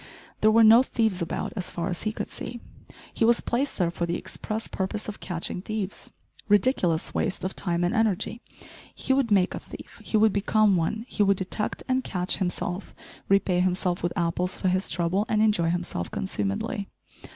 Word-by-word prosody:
There 215 - +5
were 225 +1 +6
no 225 +2 +8
thieves 220 -7 0
about 170 - -3
as 190 -4 -3
far 170 0 -3
as 180 -3 -3
he 215 - -1
could - - -5
see. 240 - -6 0.5
He - - 0
was 235 +1 +5
placed 265 +4 -1
there 175 -3 +1
for 170 0 -2
the 170 - -1
express 220 +1 -4
purpose 195 +3 -3
of 210 - -6
catching 175 0 -4
thieves. 210 -1 -5 0.4
Ridiculous 200 - +2
waste 190 - -1
of 185 - -3
time 175 -2 -1
and 175 - +1
energy 225 0 0 0.5
he 265 - 0
would 265 -3 +2
make 195 -3 +3
a - - -4
thief! - - -12
He 220 - 0
would 215 -1 +4
become 205 0 +3
one; 215 +7 -1
he 215 - -2
would 200 -1 +4
detect 190 +3 -2
and 260 0 +1
catch 180 -1 -1
himself; 180 0 -3 0.3
repay 195 -2 +3
himself 180 0 0
with 175 - 0
apples 175 +2 -1
for 185 - 0
his 185 +2 0
trouble, 185 +4 0
and 215 - +2
enjoy 210 -6 +3
himself 175 - -2
consumedly! 100 - -2
195 Hz, 185 wpm, -26 LUFS, 175-220 Hz, 0.5 s, no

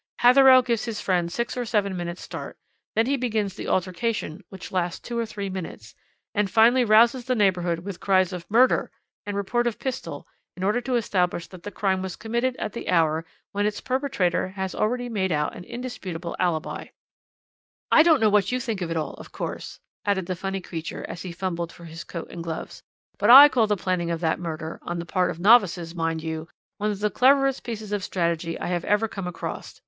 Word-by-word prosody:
"Hatherell 255 +1 +7
gives 235 -3 0
his 230 -3 -4
friend 175 -3 0
six 235 +7 -2
or 250 - -2
seven 210 -4 0
minutes' 175 0 -5
start, - - -7 0.4
then 225 - +3
he 275 +2 +1
begins 220 -6 -1
the 205 - -7
altercation 185 -1 -2
which 190 -1 -9
lasts 180 -1 -1
two 240 - -7
or 230 - -1
three 200 -2 -5
minutes, 180 - -7 0.4
and 205 -1 +1
finally 235 +5 +5
rouses 235 +3 +4
the 255 -1 0
neighbourhood 180 -5 +1
with 200 -3 -6
cries 185 -1 +2
of 175 -1 -7
'Murder' 245 +5 +4 0.4
and 205 -1 -3
report 240 +5 0
of 235 - -2
pistol 265 -2 -5 0.3
in 185 - -5
order 210 +5 +1
to 255 0 -1
establish 180 -6 0
that 185 -2 -12
the 205 - -6
crime 190 -1 0
was 190 -1 -5
committed 235 +3 -1
at - - -4
the 235 - -6
hour 160 -2 +2 0.3
when 205 +1 0
its 210 -1 -3
perpetrator 255 -11 0
has 190 0 -4
already 245 +3 -1
made 195 -5 -1
out 150 -1 0
an - - -8
indisputable 185 -9 -6
alibi." 170 -4 -1 1.0
"I - - +8
don't 320 -3 +5
know 215 -2 +3
what 205 0 +3
you 250 - 0
think 225 -5 -3
of 175 - -2
it 165 - -2
all, 155 - -3
of - - -11
course," - - -6 0.2
added 200 -3 0
the 185 - -3
funny 195 +2 -4
creature 165 -2 -6
as 170 - -7
he 185 - -6
fumbled 170 -1 -3
for 170 - -13
his 165 +1 -8
coat 170 -2 -6
and - - -9
his - - -5
gloves, 165 -1 -6 0.4
"but 205 - +2
I 275 +4 +12
call 235 -6 +2
the 210 -1 +1
planning 180 -2 -1
of 165 -1 -2
that 160 -2 0
murder 160 -2 -5
on 175 - -4
the 170 - -4
part 180 +1 +1
of 165 - -5
novices, 190 -5 +4
mind 165 -2 -2
you 160 0 -4 0.3
one 210 +1 0
of 205 -1 -4
the 210 0 +1
cleverest 270 +1 +3
pieces 220 -3 -6
of 205 -2 -1
strategy 170 -2 -1
I - - -4
have 175 -1 -1
ever 210 +2 +2
come 195 -4 -6
across. 180 - -6
195 Hz, 215 wpm, -25 LUFS, 175-230 Hz, 1.0 s, I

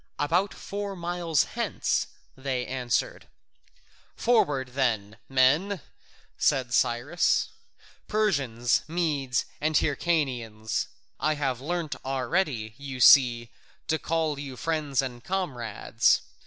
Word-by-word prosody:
"About 175 +7 +1
four 200 0 -5
miles 170 -3 0
hence," - - -1 0.3
they 130 -2 -2
answered. 125 -2 -2 0.9
"Forward 145 - +2
then, 115 -5 -1
my 135 - -14
men," 155 +10 +3 0.6
said 125 -3 +2
Cyrus, 120 +10 +2 0.6
"Persians, 135 - +1
Medes, 150 -7 0 0.2
and 155 +1 0
Hyrcanians. 125 -9 -1 0.3
I 155 0 +1
have 135 -4 -2
learnt 165 +1 -3
already, 130 - -1
you 135 -2 -6
see, 120 -3 +6 0.3
to 160 - 0
call 160 -3 -1
you 135 -3 -7
friends 150 -5 0
and 125 -2 -6
comrades. 130 - 0
140 Hz, 100 wpm, -27 LUFS, 125-165 Hz, 0.9 s, see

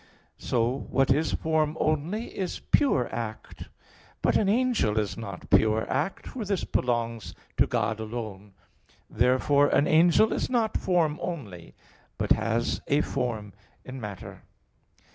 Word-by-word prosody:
So 120 +3 -1
what 135 -1 +2
is 150 +4 +1
form 160 -1 0
only 155 +9 -1
is 185 -2 -3
pure 255 - +2
act. 110 -2 -6 0.5
But - - +3
an 200 - +3
angel 230 - +1
is 105 -2 0
not 100 -5 -8
pure 110 0 +3
act, 195 - -2
for 250 - -5
this 200 -2 -1
belongs 115 -2 -2 0.2
to - - +4
God 110 -1 -1
alone. 110 -3 -6 0.6
Therefore 130 +4 +3
an 145 - +3
angel 170 +8 +4
is - - -2
not 230 -4 0
form 165 -5 +1
only, 105 - -6 0.4
but - - -2
has 115 +2 +1
a 145 +1 +3
form 115 -8 -3 0.3
in 130 0 -8
matter. 105 -3 -8
130 Hz, 135 wpm, -27 LUFS, 110-165 Hz, 0.6 s, to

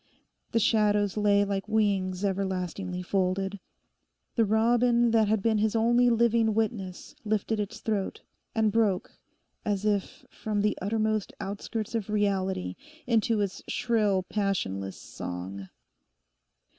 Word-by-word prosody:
The - - +1
shadows 210 -3 +2
lay 205 -1 +3
like 195 0 -2
wings 200 -3 +1
everlastingly 185 -1 -2
folded. 195 +1 -1 0.7
The 230 - +3
robin 235 +2 +3
that 220 -2 +4
had 210 -1 +1
been 220 -2 +2
his 220 +1 +1
only 240 +2 +4
living 230 -2 +3
witness 210 -5 -2
lifted 215 0 0
its 205 -1 -4
throat, 210 -3 -2 0.3
and 220 -1 +3
broke, 205 -4 +1 0.5
as 205 -1 -1
if 205 -2 -1
from 210 -2 -2
the 210 0 +1
uttermost 215 +1 0
outskirts 205 +3 -4
of 220 -3 -2
reality, 190 - 0 0.3
into 225 -2 +2
its 195 -2 -2
shrill, 210 -6 +1
passionless 175 - -2
song. 95 +2 -7
205 Hz, 120 wpm, -28 LUFS, 190-220 Hz, 0.7 s, that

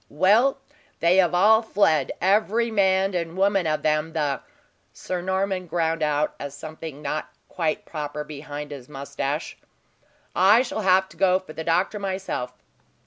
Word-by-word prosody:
"Well, 210 - +3 0.4
they 170 +2 +4
have 180 -2 +4
all 215 +5 +5
fled, 160 - +2
every 215 +4 +2
man 195 -2 +2
and 170 0 -3
woman 195 -2 +2
of 155 0 -1
them, 155 +1 0
the 145 -4 -1 0.3
" - - -42
Sir 180 -1 -4
Norman 190 0 -1
ground 165 -1 -1
out 150 0 +1 0.2
something 155 +1 -9
not 150 +2 -3 0.2
quite 160 -4 -2
proper, 150 -1 -5
behind 150 0 -8
his 135 -2 -9
moustache. 140 +1 -4 0.8
"I 205 +7 +6
shall 240 -3 -4
have 190 -1 +4
to - - -17
go 185 -1 +4
for 185 -4 -10
the 160 - -5
doctor, 180 +6 +1
myself. 190 -10 -3
175 Hz, 150 wpm, -24 LUFS, 150-195 Hz, 0.8 s, I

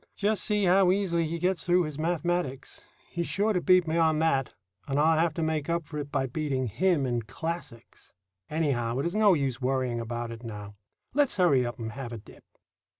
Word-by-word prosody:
Just 205 0 +1
see 210 -1 +1
how 185 0 +5
easily 175 -4 +1
he 165 +2 -3
gets 180 -1 0
through 180 0 +3
his 155 -2 -6
mathematics. 170 -4 -2 0.3
He's 170 -1 -2
sure 210 +2 +1
to 180 - 0
beat 185 -1 +5
me 160 +1 0
on 160 -2 +3
that, 145 -5 +1 0.4
and 140 0 0
I'll 160 +1 +4
have 165 -2 +1
to 165 - -1
make 155 -1 -1
up 170 -1 0
for 150 0 -6
it 145 -1 -6
by 135 -2 0
beating 135 -1 -2
him 160 - +1
in 120 -2 -1
classics. 160 - -7 0.3
Anyhow, 130 -7 0
it 135 - -1
is 170 - -1
no 210 -3 +5
use 135 -4 -2
worrying 130 -2 0
about 120 0 -4
it 115 0 -8
now. 105 -3 -7 0.4
Let's 285 -5 +2
hurry 165 -9 +4
up 120 - -6
and 110 -1 -5
have 125 +1 -7
a 115 - -5
dip." 105 - -15
155 Hz, 210 wpm, -28 LUFS, 130-175 Hz, 0.4 s, how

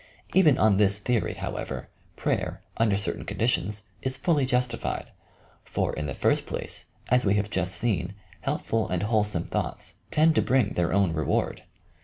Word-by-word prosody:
Even 160 -8 +6
on 105 -3 +4
this 100 -1 +4
theory, 115 +1 0
however, - - -5 0.3
prayer, - - -2
under 110 -3 +3
certain 100 - -2
conditions, 105 -2 -1 0.2
is 130 0 +1
fully 145 -2 +2
justified; 125 -1 -1 0.5
for, - - -1
in 75 -1 -3
the 65 - -4
first - - +1
place, - - -4 0.2
as 125 0 +4
we 100 0 +3
have 105 0 0
just 95 -2 0
seen, 90 -2 0 0.2
helpful 110 -3 -1
and 90 +1 -1
whole 110 0 +3
some 95 -5 0
thoughts - - -3
tend 160 +1 +4
to - - +3
bring 125 -5 +2
their 85 -1 +1
own 95 -3 +3
reward. 80 -3 0
105 Hz, 165 wpm, -27 LUFS, 95-125 Hz, 0.5 s, Even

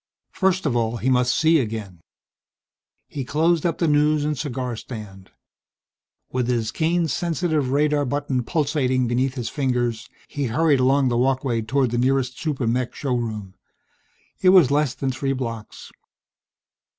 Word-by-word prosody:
First 190 -2 0
of 135 -5 0
all 115 0 0
he 130 +4 0
must 125 0 +2
see 160 +1 +4
again. 105 -7 -5 1.1
He 140 - -5
closed 160 +5 +1
up 165 - -2
the 170 - +1
news 150 0 +2
and 150 0 0
cigar 125 -4 -4
stand. 105 -5 -9 1.0
With 125 -2 -1
his 115 -3 0
cane's 165 +2 0
sensitive 160 -5 -1
radar 145 +1 +2
button 135 -1 -1
pulsating 135 -4 0
beneath 130 +2 0
his 120 -4 -4
fingers 125 -4 -1 0.2
he 145 -1 -3
hurried 140 +4 +2
along 135 +1 +3
the 120 -1 0
walkway 130 -2 +1
toward 125 +2 0
the 120 - 0
nearest 130 0 0
super 150 -8 -2
mech 120 +2 -1
showroom. 115 -7 -3 0.9
It 185 - +5
was 180 -8 +6
less 145 -3 +1
than 135 -1 -2
three 135 +2 -2
blocks.... 115 -5 -6
130 Hz, 150 wpm, -23 LUFS, 120-150 Hz, 1.1 s, was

